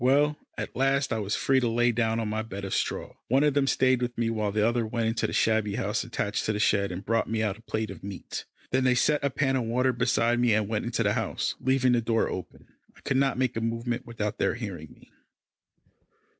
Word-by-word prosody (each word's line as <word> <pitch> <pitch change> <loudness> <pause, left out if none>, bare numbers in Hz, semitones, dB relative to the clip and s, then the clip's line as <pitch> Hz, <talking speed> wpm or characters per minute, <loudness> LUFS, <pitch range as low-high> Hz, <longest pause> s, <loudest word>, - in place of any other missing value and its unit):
Well, 145 +3 +3 0.2
at - - -5
last 135 0 +1
I 110 - -1
was 105 -1 -1
free 135 -1 +2
to 125 - 0
lie 120 +1 +2
down 115 -1 0
on 115 - -1
my 110 +1 -1
bed 100 -3 -6
of 95 - -4
straw. - - -2
One 135 +4 +3
of 150 -1 +3
them 140 -1 +2
stayed 130 -2 +3
with 120 0 -2
me 115 -1 +1
while 110 -2 -1
the 105 +1 +2
other 120 0 +1
went 115 +1 -2
into 115 - 0
the - - -5
shabby 110 -2 +1
house 105 +3 -1
attached 110 -3 -2
to 110 - 0
the 105 - -2
shed 100 -2 +2
and 90 +3 -6
brought 115 0 +1
me 110 0 0
out 105 0 -2
a - - -16
plate 110 -1 -3
of - - -11
meat. 100 -1 -6 0.3
Then 130 0 +2
they 130 -1 +4
set 150 +4 +2
a 140 - +2
pan 135 0 0
of 125 -3 0
water 125 +3 +1
beside 120 0 +2
me 120 -3 +4
and 105 -2 +1
went 110 0 -2
into 120 - 0
the - - +2
house, - - -1
leaving 130 -1 +2
the 120 -1 +3
door 115 0 +1
open. - - -7 0.3
I - - -18
could 130 - 0
not 135 -1 +2
make 130 -2 0
a 115 - -2
movement 115 +1 -2
without 110 -2 -3
their - - +1
hearing 95 - -6
me. - - -19
115 Hz, 250 wpm, -27 LUFS, 110-130 Hz, 0.3 s, they